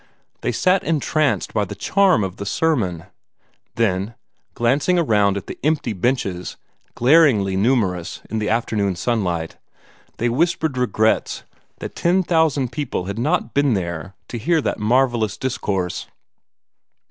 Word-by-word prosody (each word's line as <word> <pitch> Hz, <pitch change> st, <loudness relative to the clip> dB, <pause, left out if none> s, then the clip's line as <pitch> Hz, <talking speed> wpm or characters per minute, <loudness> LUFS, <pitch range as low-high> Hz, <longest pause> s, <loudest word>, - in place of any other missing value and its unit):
They -, -, 0 dB
sat 185 Hz, +1 st, +2 dB
entranced 155 Hz, -2 st, 0 dB
by 105 Hz, -, +1 dB
the 105 Hz, +1 st, -6 dB
charm 185 Hz, -, +3 dB
of 95 Hz, -1 st, -4 dB
the 100 Hz, -, -5 dB
sermon; 100 Hz, -, 0 dB, 0.7 s
then, 105 Hz, -1 st, 0 dB, 0.4 s
glancing 140 Hz, +9 st, +2 dB
around 105 Hz, -, +2 dB
at 100 Hz, -, -6 dB
the -, -, -8 dB
empty 150 Hz, -6 st, 0 dB
benches, 95 Hz, -4 st, -2 dB, 0.4 s
glaringly 125 Hz, -, +4 dB
numerous 95 Hz, -5 st, 0 dB
in 110 Hz, -, -3 dB
the 105 Hz, -, -1 dB
afternoon 105 Hz, -4 st, 0 dB
sunlight, 85 Hz, -5 st, -2 dB, 0.6 s
they 120 Hz, -, 0 dB
whispered 160 Hz, +3 st, 0 dB
regrets 110 Hz, -3 st, 0 dB, 0.4 s
that -, -, -6 dB
ten 180 Hz, +2 st, +2 dB
thousand 160 Hz, -7 st, +1 dB
people 140 Hz, -11 st, -3 dB
had 100 Hz, +3 st, -4 dB
not 120 Hz, -1 st, 0 dB
been 140 Hz, -4 st, +2 dB
there 85 Hz, 0 st, -4 dB
to 120 Hz, -, -5 dB
hear 165 Hz, +8 st, +2 dB
that 145 Hz, -, -2 dB
marvellous 115 Hz, -2 st, +1 dB
discourse. 95 Hz, -8 st, -2 dB
115 Hz, 135 wpm, -21 LUFS, 100-145 Hz, 0.7 s, glaringly